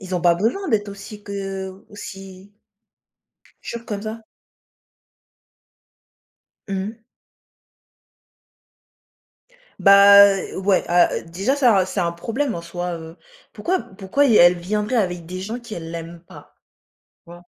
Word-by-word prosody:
Ils 185 -2 -6
ont 180 - -1
pas 170 0 +4
besoin 235 - -1
d'être 210 -4 0
aussi 200 +1 -10
que 195 -1 -6
aussi 195 0 -11 1.1
Jure, 235 0 -7
comme 205 -3 -5
ça. 220 +1 -6 2.5
Mmh. 200 +4 -4 2.8
Bah, 200 0 +8
heu, 190 - -6
ouais, 190 0 +1
a 175 +1 +4
heu, - - -4
déjà 195 +11 -2
ça 245 -8 +4
un 185 - +3
c'est 190 +1 -3
un 170 -1 0
problème 230 +10 -3
en 170 - -5
soi, 175 +1 -5
heu. 160 0 -11 0.4
Pourquoi 370 +1 -1
pourquoi 195 +8 -1
y 230 -5 +4
elle 175 -1 +6
viendrait 210 +7 -2
avec 180 -6 -1
des 185 +2 -6
gens 220 +6 -5
qu'elle 195 -9 -8
l'aime 170 0 -8
pas, - - -15 0.7
tu - - -17
vois? 175 0 -12
195 Hz, 135 wpm, -21 LUFS, 175-215 Hz, 2.8 s, Bah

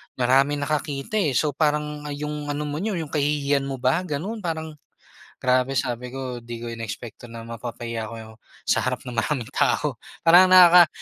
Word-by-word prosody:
maraming 135 +3 +2
nakakita 150 +7 -2
eh. 150 -8 +1
So, 150 - +2
parang, 150 -1 -1
ah, - - -4
yung 150 0 -5
ano 145 +1 -3
mo 145 - -4
niyo, 215 +4 -2
yung 155 -3 -6
kahihiyan 145 -2 +1
mo 135 - -3
ba, 130 +6 +2
ganun. 180 +9 -3
Parang, 160 -2 -3 0.7
grabe 130 +1 +2
sabi 125 -1 -2
ko 130 -1 -5
di 120 0 -8
ko 120 - -5
inexpect 115 0 -7
'to 120 - -11
na 115 0 -9
mapapahiya 115 -1 -5
ako 115 - -8
yo 110 -1 -10 0.3
sa - - +2
harap 130 +1 -2
ng 125 - -7
maraming 120 +1 -2
tao - - 0 0.2
parang 175 +3 +8
nakaka 180 -2 +8
140 Hz, 185 wpm, -24 LUFS, 120-150 Hz, 0.7 s, parang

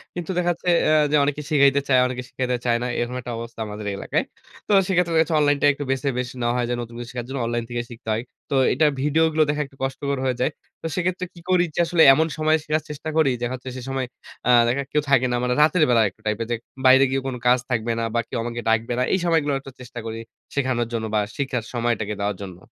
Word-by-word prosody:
কিন্তু 175 +1 -4
দেখা 175 0 +1
যাচ্ছে 175 +1 -7
যে, 170 - +4
এ - - +4 0.2
যে - - +3
অনেকে 145 +1 -1
শিখাইতে 140 -2 +4
চায়, 130 -2 +5
অনেকে 125 0 -5
শিখাইতে 125 -1 -1
চায় 120 -1 +3
না। - - -1
এরকম 120 +1 -2
একটা 125 - -6
অবস্থা 115 0 -8
আমাদের 105 0 -7
এলাকায়। - - -1 0.4
তো - - -2 0.2
সেক্ষেত্রে 180 -3 +1
দেখা 160 - +5
গেছে 165 - -4
অনলাইনটা 145 -1 +2
একটু 145 +1 -5
বেছে 135 +2 -1
বেশ 125 0 -2
নেওয়া 120 0 +1
হয়, 120 -1 0
যেন 120 - -1
নতুন 115 0 -8
কিছু 120 0 -7
শেখার 120 -2 -5
জন্য, 135 -1 -3
অনলাইন 120 0 -1
থেকে 120 0 -2
শিখতে 115 -1 -9
হয়। 110 +2 -2 0.3
তো 140 - 0 0.2
এটার 150 +3 +3
ভিডিওগুলো 155 +2 +3
দেখা 150 0 0
একটু 135 0 -19
কষ্টকর 140 +1 -2
হয়ে 130 -1 +1
যায়। 130 - +2 0.3
তো - - -9
সেক্ষেত্রে 185 0 -1
কি 170 - -14
করি 180 -1 +4
যে - - -2
আসলে 165 0 +2
এমন 160 +4 +2
সময় 155 0 +3
শেখার 155 0 -1
চেষ্টা 150 +2 -6
করি 155 -4 +4
যে, 125 - -2
দেখা 120 - -1
যাচ্ছে 130 +1 -8
সে - - -6
সময় 135 -1 -1 0.4
আ - - +3 0.2
দেখার 135 +4 0
কেউ 150 - +2
থাকে 130 -2 +4
না। - - +1
মানে 125 - +1
রাতের 160 +2 +4
বেলা 115 -2 +5
একটা - - -26
টাইপে 110 +2 0
যে 120 - +2 0.3
বাইরে 130 +1 +7
গিয়েও 135 0 -1
কোন 130 - -3
কাজ 125 0 +5
থাকবে 120 -2 0
না। - - -1
বা, 120 - +2
কেউ - - -4
আমাকে 120 0 -4
ডাকবে 115 +2 +1
না। - - +3
এই 190 - +2
সময়গুলো 160 -4 +2
একটু 135 0 -11
চেষ্টা 125 -1 -8
করি 115 0 -4 0.4
শেখানোর 130 -4 0
জন্য 110 -1 -2
বা, - - +4 0.2
শিখার 130 -4 -2
সময়টাকে 115 -3 -1
দেওয়ার 100 0 -1
জন্য। 90 -3 -8
130 Hz, 250 wpm, -23 LUFS, 120-150 Hz, 0.4 s, বাইরে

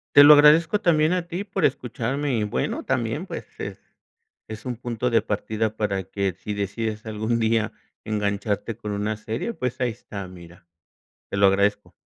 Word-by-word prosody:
Te 145 - +11
lo 150 +1 +11
agradezco 160 +7 +6
también 160 -2 +3
a 180 -2 -1
ti 175 +4 -3
por 195 -4 -1
escucharme 130 +2 -1
y 105 - 0
bueno 85 -11 -2
también - - -1
pues - - -6
es - - -5 0.7
es 110 +2 -8
un 125 -1 -3
punto 120 0 -2
de 115 -2 +4
partida 110 +1 -2
para 100 -3 -1
que 95 -1 -2
si 105 - -6
decides 110 +2 -3
algún 110 +2 -1
día 110 -1 +1 0.3
engancharte 105 +1 -2
con 105 -2 -6
una 105 +2 -1
serie 115 - -4
pues 125 - -3
ahí 125 -2 +1
está 100 -2 -8
mira. 85 -1 -14 0.6
Te - - -3
lo 100 0 +5
agradezco. 100 +1 +1
110 Hz, 175 wpm, -24 LUFS, 105-130 Hz, 0.7 s, Te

